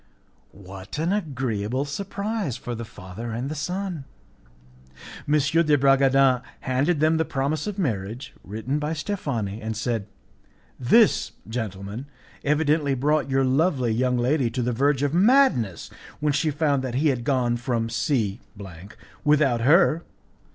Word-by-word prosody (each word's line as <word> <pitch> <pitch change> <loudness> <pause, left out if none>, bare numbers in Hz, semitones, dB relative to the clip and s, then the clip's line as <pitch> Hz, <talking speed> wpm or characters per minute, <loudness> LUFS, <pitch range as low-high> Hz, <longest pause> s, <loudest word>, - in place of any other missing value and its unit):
What 95 +4 -9
an 165 +5 0
agreeable 130 - -2
surprise 200 - -3
for 120 - -6
the 115 0 -5
father 100 +2 -8
and 130 +7 -3
son! 180 -1 -4 1.2
M. 145 - +1
de 150 +1 +3
Bragadin 135 -1 +4 0.2
handed 140 +6 0
them 155 +1 +3
the 160 - +2
promise 145 +4 -2
of 210 -1 -4
marriage 115 - -3
written 110 +8 -3
by 150 +2 -2
Steffani, 140 - -3
and 110 0 -4
said, 110 -3 -2 0.7
"This, 210 - +4
gentlemen, 110 +1 -5 0.4
evidently 150 -1 +2
brought 145 +2 +1
your 135 0 +2
lovely 130 -2 +1
young 125 +2 +1
lady 125 +1 +1
to 125 +2 -2
the 125 +1 0
verge 140 +3 +1
of 145 0 0
madness 185 - +3 0.3
when 150 -1 +1
she 150 +3 +1
found 145 -2 0
that 125 -2 -3
he 150 +4 +2
had 125 -4 -1
gone 125 -3 +1
from 120 -1 -1
C 115 -4 -1 0.8
without 140 -5 +3
her. 160 +4 +4
135 Hz, 135 wpm, -24 LUFS, 120-155 Hz, 1.2 s, Bragadin